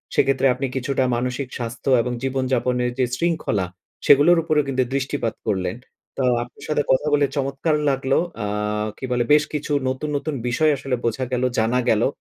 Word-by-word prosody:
সেক্ষেত্রে 135 0 +3
আপনি 130 +2 -3
কিছুটা 130 +1 0
মানসিক 125 +2 -2
স্বাস্থ্য 120 +2 -4
এবং 125 - -3
জীবনযাপনের 125 -2 0
যে 130 - +4
শৃঙ্খলা, 155 - 0 0.4
সেগুলোর 145 +5 +6
উপরেও 155 -2 +2
কিন্তু 130 -1 +1
দৃষ্টিপাত 135 -4 -1
করলেন। 95 -3 -1 0.4
তো, 135 - 0 0.2
আপনার 120 - -15
সাথে 150 - +1
কথা 130 +3 +2
বলে 145 -1 +4
চমৎকার 140 +3 0
লাগলো। 135 0 +1 0.3
আ - - -2 0.5
কি - - -5
বলে? 120 -1 +2
বেশ 150 0 +5
কিছু 150 0 -3 0.2
নতুন, 130 +4 -3
নতুন 150 +2 -4
বিষয় 155 +6 +3
আসলে 135 -1 -2
বোঝা 120 +3 0
গেলো, 125 0 +1
জানা 115 +3 +2
গেলো। 110 +1 +3
130 Hz, 165 wpm, -22 LUFS, 125-140 Hz, 0.5 s, সেগুলোর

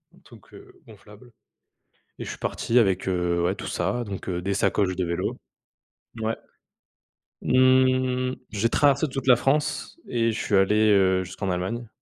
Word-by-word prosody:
un - - -21
truc, - - -17
heu, - - -14
gonflable 110 +2 -16 0.9
et - - -6
je - - -6
suis - - -7
parti 120 +2 0
avec, 95 -4 +1
heu, 90 -2 0
ouais, 90 +2 +1
tout - - -8
ça, 95 +8 -2
donc 100 -2 -6
des 90 +2 -2
sacoches 95 -2 0
de 95 - -1
vélo 85 0 -2 0.9
ouais. 110 +1 -1 1.1
Mmh. 130 0 +2 0.2
J'ai 110 +2 0
traversé 140 +3 +3
toute 135 0 -5
la 125 - +8
France 145 - -1
et 115 -1 0
je 110 - -4
suis 105 - 0
allé, 105 +3 +3
heu, 95 -2 +3
jusqu'en 95 +1 -4
Allemagne 115 +7 -3
110 Hz, 160 wpm, -24 LUFS, 95-125 Hz, 1.1 s, la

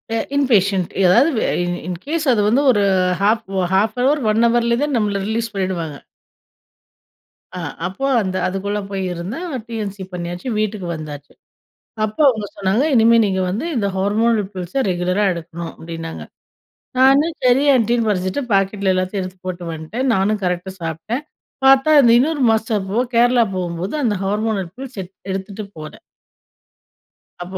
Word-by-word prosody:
எ - - +1 0.2
inpatient, 200 -9 +2
ஏதாவது 185 - +5
வெ - - +1 0.2
in 175 0 -1
in case 290 - -3
அது 215 - +2
வந்து 240 +6 +3
ஒரு 205 -4 +2 0.4
1/2 195 -1 +1
நஹவர், 280 +4 +2
1 225 +2 +2
ஹவர்ல, 235 0 +2
தான் 295 -1 -1
நம்மள 205 -3 0
ரிலீஸ் 230 0 -2
பண்ணிடுவாங்க. 180 -6 -3 1.6
அ 180 - -4 0.3
அப்போ 195 +9 -4 0.2
அந்த 185 -2 -2
அதுக்குள்ளே 200 +2 -2
போய் 195 -1 -2
இருந்தேன். 230 - -5 0.2
டி.என்.சி 205 -4 -5
பண்ணியாச்சு, 175 +4 -5
வீட்டுக்கு 210 -4 -2
வந்தாச்சு. 150 -2 -9 0.7
அப்போ 215 +6 -4
அவங்க 220 -5 0
சொன்னாங்க. 200 +7 +1
இனிமே 230 0 +5
நீங்க 190 -1 -1
வந்து 215 - -3
இந்த 200 -3 +1
ஹார்மோனல் 210 +2 +1
பில்ஸ 185 +4 -7
ரெகுலரா 180 +3 0
எடுக்கணும் 170 0 -7
அப்படின்னாங்க. 165 0 -7 0.8
நானும் 280 +5 +4
சரி 250 +2 +4
ஆன்டின்னு 235 -1 +2
படிச்சுட்டு 185 +6 -1
பாக்கெட்டில 195 0 +2
எல்லாத்தையும் 185 +2 -1
எடுத்து 185 0 -8
போட்டு 180 -1 -5
வந்துட்டேன். 165 +12 -4
நானும் 205 +2 +1
கரெக்ட்டா 180 +1 -2
சாப்பிட்டேன். 165 - -4 0.4
பார்த்தா 270 +3 +6
அந்த 235 - +5
இன்னொரு 295 +1 0
மாஸ்டர் 220 -3 0
போ 205 - -2 0.2
கேரளா 240 +1 +5
போகும்போது 175 +1 -3
அந்த 220 -4 +1
ஹார்மோனல் 205 -2 -1
பில்ஸ் 265 -4 -9
எடு 180 - -15 0.2
எடுத்துட்டு 195 +2 -5
போகல. 155 -1 -9 1.5
அப்போ 185 +1 -7
200 Hz, 140 wpm, -19 LUFS, 185-235 Hz, 1.6 s, பார்த்தா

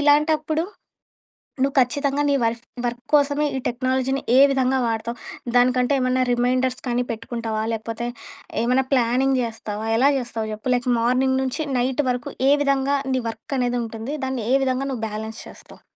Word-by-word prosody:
ఇలాంటప్పుడు 305 +2 +3 1.0
నువ్వు 275 +1 +2
ఖచ్చితంగా 280 +2 0
నీ - - +3
వర్ఫ్ 230 +1 0 0.3
వర్క్ 240 0 -2
కోసమే 290 0 +3
ఈ - - -1
టెక్నాలజీని 260 +2 0 0.2
ఏ - - +8
విధంగా 265 -1 +2
వాడతావు? 230 +1 -3 0.4
దానికంటే 250 +2 +3
ఏమన్నా 255 0 +2
రిమైండర్స్ 255 +1 +1
కానీ 245 0 +1
పెట్టుకుంటావా? 225 -1 -3
లేకపోతే 225 +2 -4 0.6
ఏమన్నా 255 +2 +2
ప్లానింగ్ 255 +2 +2
చేస్తావా? 220 -2 -5
ఎలా 270 +4 +5
చేస్తావు 225 -3 -4
చెప్పు? 235 +4 -1
లైక్ 245 0 -2
మార్నింగ్ 255 +3 +2
నుంచి 265 +4 -2
నైట్ 255 +3 +1
వరకు 245 -1 -2 0.2
ఏ - - +6
విధంగా 275 0 +2 0.2
నీ 255 - +1
వర్క్ 225 +5 -6
అనేది 245 0 0
ఉంటుంది? 225 +4 -5
దాన్ని 260 -4 -3
ఏ - - +6
విధంగా 260 +1 0
నువ్వు 240 -4 -4
బ్యాలెన్స్ 220 +1 -6
చేస్తావు? - - -13
255 Hz, 155 wpm, -23 LUFS, 235-270 Hz, 1.0 s, ఏ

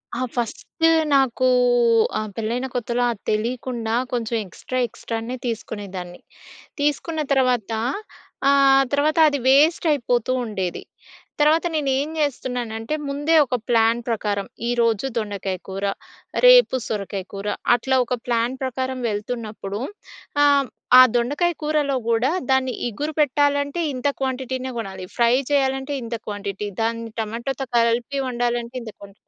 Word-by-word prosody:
ఆ 250 - -3
ఫస్టు 245 +7 0 0.3
నాకు 255 -1 +2 0.7
ఆహ్, 215 -1 -3
పెళ్ళైన 235 +4 -2
కొత్తలో 245 0 0
అది 215 - -8
తెలియకుండా 230 +1 -2 0.2
కొంచెం 235 -1 -1
ఎక్స్‌ట్రా 255 +7 -5
ఎక్స్‌ట్రానే 230 +2 -5
తీసుకునేదాన్ని. 195 -6 -5 0.6
తీసుకున్న 305 +2 0
తర్వాత. 250 -5 +1 0.8
ఆహ్, 275 -1 +6
తర్వాతది 300 0 +3
వేస్టయిపోతూ 275 -4 +3
ఉండేది. 190 -5 -3 0.6
తర్వాత 310 +3 +4
నేను 285 -3 0
ఏం 295 +2 -2
జేస్తున్నానంటే 245 -3 -2
ముందే 290 +4 +1
ఒక 250 - -2
ప్లాన్ 230 0 +3
ప్రకారం 205 -3 -1 0.2
ఈరోజు 230 -1 +1
దొండకాయ 200 -3 -3
కూర 195 +1 -5 0.6
రేపు - - +7
సొరకాయ 200 -2 -3
కూర 200 +1 -5 0.3
అట్లా 265 +2 0
ఒక 250 +1 -2
ప్లాన్ 240 +1 0
ప్రకారం 260 0 -2
వెళ్తున్నప్పుడు 210 -1 -4 0.6
ఆహ్, 280 -2 +4 0.3
ఆ - - +12
దొండకాయ 290 +9 +1
కూరలో 300 -2 +1
గూడా 235 +5 +2 0.2
దాన్ని 260 -1 +2 0.2
ఇగురు 295 +8 -4
పెట్టాలంటే 285 +2 +2
ఇంత 255 +2 -2
క్వాంటిటీనే 260 0 -2
గొనాలి. 190 -3 -6
ఫ్రై 235 0 +4 0.2
చేయాలంటే 270 0 +1
ఇంత 230 0 -4
క్వాంటిటీ. 205 0 -4
దాన్ని 230 0 -2
టమాటోతో 235 +5 -4
కలిపి 235 +4 +1
వండాలంటే 240 0 -2
ఇంత 220 -2 -8
క్వాంటి 200 -1 -13
245 Hz, 120 wpm, -22 LUFS, 225-275 Hz, 0.8 s, ఆ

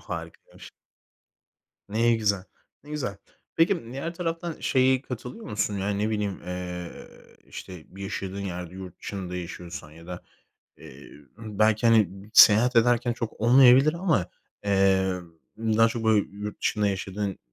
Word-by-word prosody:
Harikaymış. - - -9 1.2
Ne 115 +3 +2
güzel. 100 -4 0 0.4
Ne 150 - -13
güzel. 130 -9 -3 0.4
Peki, 165 -2 +2
diğer 165 +6 -5
taraftan 165 -1 -4
şeye 130 0 +2
katılıyor 125 - -8
musun? 105 -1 -1
Ya, 95 +1 -2
ne 105 +2 -1
bileyim, 105 -3 -2
eee, 90 -1 -5 0.5
işte, 90 -4 -10
bir 95 +2 -11
yaşadığın 100 0 -5
yerde 90 -2 -6
yurt 95 -2 -9
dışında 90 -3 -6
yaşıyorsan 85 -3 -7
ya 85 +2 -15
da, 90 -1 -7 0.5
eee, 70 +2 -13 0.3
belki, 110 +1 +1
hani, 110 -5 +5 0.2
seyahat 120 +3 +7
ederken 120 +1 +3
çok 115 -2 -6
olmayabilir 130 +5 +6
ama, 170 - 0 0.4
eee, 95 -1 +2 0.4
daha 115 0 +3
çok, 115 0 -4
böyle, 110 -2 +3
yurt 105 +1 -7
dışında 105 -1 +1
yaşadın 95 0 -3
105 Hz, 135 wpm, -26 LUFS, 95-120 Hz, 1.2 s, seyahat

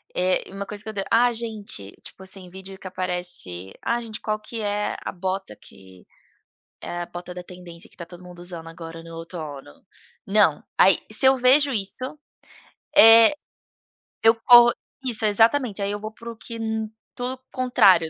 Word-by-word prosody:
Eh 185 +1 +1
uma 200 0 -6
coisa 205 0 -5
que 220 - -7
eu - - -6
de 195 -1 -2
ah 240 +1 +4
gente, 215 - -5
tipo 190 - -13
assim 190 -1 -9
vídeo 190 +1 -11
que 185 - -9
aparece, 180 - -4
"ah, 235 +1 0
gente 225 -2 -8
qual 215 0 -2
que 220 +1 -7
é 205 0 -2
a - - -4
bota 185 - -4
que, 95 -1 -18 0.8
eh, 175 0 -5
a - - -4
bota 175 +1 -8
da 180 - -7
tendência 175 -2 -13
que - - -24
tá 170 - -7
todo 175 +1 -13
mundo 180 -1 -13
usando 175 -2 -8
agora 165 0 -10
no 165 0 -11
outono?" 155 - -9 0.4
Não, 195 -7 +3
aí 190 - +6
se 220 - +2
eu 265 0 +7
vejo 265 +2 +4
isso, 210 +4 0 0.9
eh, 225 +4 +9 0.9
eu 225 0 +7
corro 240 -1 +9 0.3
isso 230 -3 +2
exatamente 225 +1 +2
aí 200 - -1
eu 205 - -4
vou 215 +1 -7
para 235 +1 -10
o - - -11
que, 230 +1 -9 0.6
tudo 250 +1 -4
contrário. 195 -10 +4
195 Hz, 175 wpm, -23 LUFS, 175-225 Hz, 0.9 s, eh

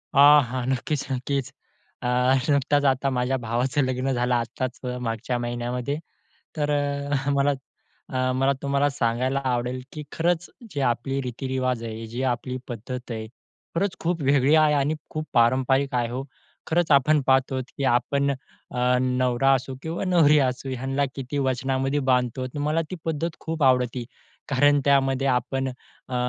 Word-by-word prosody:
हां, 145 +1 +8
हां. 125 +1 -4
नक्कीच, 135 +2 -1
नक्कीच. 130 +1 -2 0.5
अ, - - -1 0.4
नुकताच 145 +1 +2
आता 135 0 +2
माझ्या 125 +2 +1
भावाचं 125 +5 0
लग्न 130 +1 -1
झालं 125 0 0
आत्ताच 120 +2 -3 0.2
मागच्या 115 +1 -2
महिन्यामध्ये, 120 +3 -3 0.6
तर 150 -1 0
अ, 145 -1 -1
मला 140 0 +3 0.6
अ, 130 0 +1
मला 135 +1 +2
तुम्हाला 140 +1 +2
सांगायला 130 +1 0
आवडेल, 125 0 -1
की 150 - -6
खरंच 175 +1 0 0.3
जे 145 - -1
आपली 130 +2 0
रीतिरिवाज 130 -1 -2
आहे, 115 0 -6
जे 120 +3 -4
आपली 125 +1 -3
पद्धत 125 +2 -6
आहे, 110 -1 -4 0.5
खरंच 190 +3 0
खूप 170 -1 -1
वेगळी 140 +1 +4
आहे 155 -1 +5
आणि 145 +2 +1 0.2
खूप 155 0 -4
पारंपरिक 130 +3 +3
आहे 120 -1 +1
हो. 125 +3 -4 0.4
खरंच 170 0 +1
आपण 145 +2 +5
पाहत 135 0 +3
आहोत, 130 -1 -2
की 140 - -2
आपण 140 +4 +1
अ, 125 -2 -2
नवरा 130 +1 +2
असो 130 0 -3
किंवा 165 +4 -3
नवरी 160 -5 +5
असू 130 -1 0
ह्यांला 135 +2 -1
किती 135 +1 -4
वचनामध्ये 135 +1 0
बांधतो. 125 0 +1
तर 130 - -7
मला 150 +3 +1
ती 185 - -4
पद्धत 160 +1 -2
खूप 160 -2 -4
आवडते, 125 -2 +2 0.4
कारण 145 +1 +4
त्यामध्ये 135 -1 +3
आपण 135 +1 0
अ, 130 0 -11
135 Hz, 155 wpm, -25 LUFS, 125-145 Hz, 0.6 s, हां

